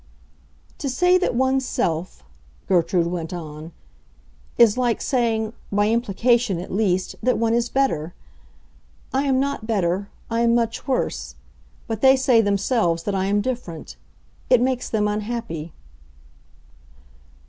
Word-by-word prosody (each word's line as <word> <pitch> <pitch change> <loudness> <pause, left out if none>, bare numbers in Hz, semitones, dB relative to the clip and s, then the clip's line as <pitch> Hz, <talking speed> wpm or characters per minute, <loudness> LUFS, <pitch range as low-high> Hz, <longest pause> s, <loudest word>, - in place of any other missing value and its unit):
"To 275 - -2
say 360 +8 +3
that 365 - 0
one's 265 +1 +2
self," 165 - -2 0.4
Gertrude 175 -1 +2
went 170 -1 -4
on, 155 -1 -7 0.9
"is 230 -3 +6
like 245 -3 0
saying—by 220 -4 -1
implication, 235 -1 +1
at 175 - -7
least—that 200 +4 0
one 230 0 +1
is 235 0 +1
better. 175 - 0 1.0
I 270 +2 +1
am 265 -2 +2
not 275 -5 -2
better; 195 -2 0 0.2
I 230 0 -1
am 235 0 +3
much 230 +1 -1
worse. 265 - -2 0.5
But 225 -3 -4
they 265 0 +7
say 260 -3 +4
themselves 200 -4 +1
that 205 - -2
I 190 -1 0
am 205 +1 +2
different. 220 -9 -5 0.5
It 250 - +6
makes 255 0 -1
them 210 -2 +1
unhappy." 210 -6 -4
225 Hz, 125 wpm, -22 LUFS, 185-250 Hz, 1.0 s, they